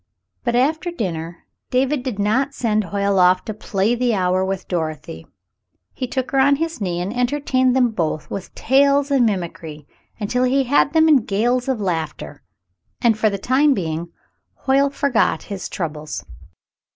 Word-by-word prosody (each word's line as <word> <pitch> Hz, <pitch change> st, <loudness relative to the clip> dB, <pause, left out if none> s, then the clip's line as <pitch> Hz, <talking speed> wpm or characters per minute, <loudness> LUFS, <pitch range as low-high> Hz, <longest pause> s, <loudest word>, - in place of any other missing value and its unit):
But 240 Hz, -1 st, 0 dB
after 315 Hz, +8 st, +1 dB
dinner, 170 Hz, -, -5 dB, 0.2 s
David 265 Hz, +2 st, +1 dB
did 250 Hz, -5 st, -4 dB
not 255 Hz, +8 st, 0 dB
send 215 Hz, -3 st, 0 dB
Hoyle 200 Hz, +1 st, 0 dB
off 180 Hz, 0 st, +4 dB
to 215 Hz, -, -4 dB
play 205 Hz, +1 st, -1 dB
the 245 Hz, -2 st, +1 dB
hour 185 Hz, 0 st, +1 dB
with 190 Hz, -1 st, -3 dB
Dorothy. 155 Hz, -, -4 dB, 0.7 s
He 255 Hz, -, -4 dB
took 260 Hz, +3 st, -3 dB
her 270 Hz, -, +2 dB
on 280 Hz, +1 st, +5 dB
his 325 Hz, -3 st, -4 dB
knee 175 Hz, -3 st, -2 dB
and 190 Hz, +6 st, -4 dB
entertained 255 Hz, 0 st, +1 dB
them 250 Hz, -3 st, +3 dB
both 160 Hz, -6 st, -2 dB
with 195 Hz, -1 st, -6 dB
tales 280 Hz, +2 st, +3 dB
and 260 Hz, -4 st, +4 dB
mimicry 165 Hz, -6 st, -5 dB, 0.3 s
until 245 Hz, +4 st, 0 dB
he 265 Hz, +2 st, +2 dB
had 280 Hz, +2 st, +2 dB
them 320 Hz, -1 st, +5 dB
in 305 Hz, -3 st, +6 dB
gales 240 Hz, +3 st, 0 dB
of 260 Hz, -4 st, 0 dB
laughter, 160 Hz, -6 st, -4 dB, 0.6 s
and 230 Hz, -2 st, +3 dB
for 215 Hz, 0 st, +2 dB
the 200 Hz, -, -3 dB
time 270 Hz, +7 st, +2 dB
being 170 Hz, -2 st, -4 dB, 0.5 s
Hoyle 275 Hz, +1 st, +3 dB
forgot 280 Hz, -4 st, +1 dB
his 200 Hz, -2 st, -6 dB
troubles. 155 Hz, -, -5 dB
225 Hz, 165 wpm, -20 LUFS, 185-265 Hz, 0.7 s, in